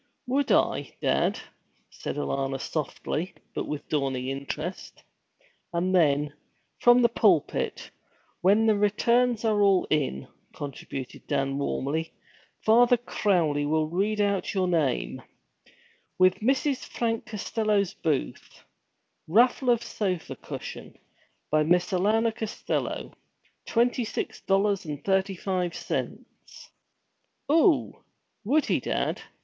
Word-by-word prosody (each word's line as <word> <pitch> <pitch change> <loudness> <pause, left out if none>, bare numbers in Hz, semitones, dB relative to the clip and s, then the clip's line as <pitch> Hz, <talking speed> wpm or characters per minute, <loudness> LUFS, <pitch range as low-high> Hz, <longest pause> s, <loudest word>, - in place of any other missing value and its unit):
'Would 275 +3 0
I, - - +1
dad?' - - +1 0.5
said - - -5
Alanna 135 -2 -2
softly, 155 +4 -3 0.2
but - - -3
with 150 - -5
dawning 135 -3 -1
interest. 140 +6 -6 0.7
'And 175 +2 0
then, 150 -4 +3 0.5
from 245 0 +6
the - - +7
pulpit, 200 -9 +1 0.5
when 205 +4 +4
the 220 -1 +4
returns 235 +3 +2
are 215 -2 +2
all 195 -2 +4
in,' 140 - 0 0.3
contributed 135 -2 -7
Dan 135 0 0
warmly, 150 +3 -2 0.5
'Father 240 +2 +6
Crowley 175 -10 +1
will 155 +1 +2
read 205 +5 0
out 200 0 0
your 185 -1 +1
name, 155 -8 0 1.0
"With 185 0 +4
Mrs. 265 +3 +1
Frank 225 -1 -2
Costello's 210 -2 0
booth 155 -8 -3 0.6
raffle 245 - +3
of 235 -1 +3
sofa 190 -7 -3
cushion, - - -8 0.5
by 155 - +4
Miss 175 +5 +2
Alanna 220 +5 +2
Costello, 220 -2 -3 0.5
twenty 245 +1 +2
six 220 - -4
dollars 195 0 +1
and 150 -3 -6
thirty 190 0 +1
five 180 -2 -2
cents!" - - -6 0.8
'Oo 325 +1 +3 0.4
would 285 +8 +2
he, - - +1
dad?' - - -2
190 Hz, 110 wpm, -27 LUFS, 155-225 Hz, 1.0 s, the